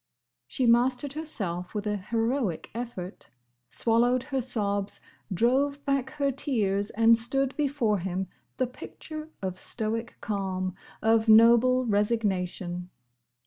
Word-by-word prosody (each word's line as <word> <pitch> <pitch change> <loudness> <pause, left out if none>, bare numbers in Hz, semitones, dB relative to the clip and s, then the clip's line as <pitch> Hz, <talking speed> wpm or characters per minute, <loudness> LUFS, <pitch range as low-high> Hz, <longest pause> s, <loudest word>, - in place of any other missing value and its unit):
She 255 - -1
mastered 250 +3 +3
herself 200 - -3
with 210 0 -2
an 210 -1 -1
heroic 230 - -1
effort; 225 -6 -6 0.4
swallowed 240 - +2
her 265 -1 -2
sobs; 205 -5 -1 0.3
drove 270 +8 +1
back 275 -2 0
her 280 -2 0
tears; 210 -7 0
and 230 +1 +5
stood 260 +4 -1
before 270 -8 +1
him, 185 +1 -2 0.3
the 255 - +2
picture 310 +5 -9
of 185 -1 -3
stoic 225 +1 -3
calm, 190 -3 -2 0.3
of 225 0 +3
noble 235 +3 +6
resignation. 190 -5 -1
230 Hz, 115 wpm, -27 LUFS, 200-255 Hz, 0.4 s, noble